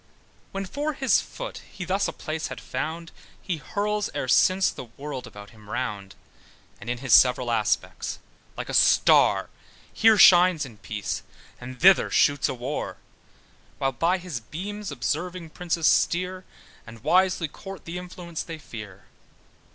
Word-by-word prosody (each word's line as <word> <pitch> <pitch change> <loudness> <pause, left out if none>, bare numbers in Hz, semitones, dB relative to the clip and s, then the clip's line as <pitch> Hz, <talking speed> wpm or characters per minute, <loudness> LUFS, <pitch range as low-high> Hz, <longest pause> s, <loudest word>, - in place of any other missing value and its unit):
When 195 0 -4
for 290 +10 -3
his 265 -2 +2
foot - - -8
he 180 - -7
thus 195 +3 0
a - - -3
place 155 +1 -4
had - - -7
found, 165 +2 -5 0.3
He 180 -5 -3
hurls 210 +5 -2
e'er - - -2
since 185 +8 +4
the - - -8
world 135 +3 -7
about 100 0 -12
him 105 -2 -17
round, 105 -6 -4 0.6
And 100 - -8
in 120 - -1
his 125 -1 0
several 125 -1 +5
aspects, 110 -2 -1 0.4
like - - -5
a - - -5
star, - - +4 0.4
Here 220 -1 +5
shines 180 -5 +7
in 115 -5 -12
peace, 105 -4 -4 0.4
and 125 +1 -9
thither 190 +1 +6
shoots 145 -2 +3
in 130 - -4
war, 130 +5 -4 0.8
While 135 - 0
by 170 +8 +1
his 175 -8 -5
beams 200 - -6
observing 175 +1 -3
princes 170 -2 -2
steer, 180 +3 +2 0.4
And 110 -1 -12
wisely 185 -2 +3
court 195 +3 -10
the 170 +2 -5
influence 180 -2 -7
they 165 -1 -7
fear. 105 -9 -10
165 Hz, 150 wpm, -25 LUFS, 125-185 Hz, 0.8 s, shines